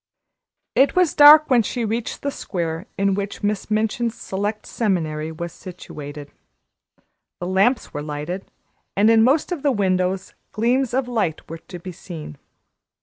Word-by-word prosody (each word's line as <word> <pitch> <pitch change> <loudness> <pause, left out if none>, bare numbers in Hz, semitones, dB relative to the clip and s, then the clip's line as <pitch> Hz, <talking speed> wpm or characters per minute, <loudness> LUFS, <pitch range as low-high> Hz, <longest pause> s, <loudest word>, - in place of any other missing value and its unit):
It 275 - +3
was 365 -4 +3
dark 300 +1 +9
when 245 -2 +6
she 235 +2 -2
reached 225 +1 -3
the 280 - -1
square 170 -4 -4
in 195 0 +2
which 200 +2 -4
Miss 205 0 -1
Minchin's 220 +2 0
Select 205 +1 -4
Seminary 160 -8 -1
was 170 +2 -6
situated; 150 -5 -9 1.1
the 175 - -4
lamps 195 +7 +1
were 145 - -3
lighted, 150 +5 -5 0.5
and 210 +3 +5
in 225 -1 +5
most 285 +8 +2
of 345 -5 -2
the 285 - +2
windows 185 -3 0 0.2
gleams 245 +3 +1
of 265 -1 0
light 215 -10 -2
were 165 +1 -7
to 180 +2 -10
be 185 +2 -8
seen. 165 - -9
200 Hz, 150 wpm, -22 LUFS, 170-240 Hz, 1.1 s, dark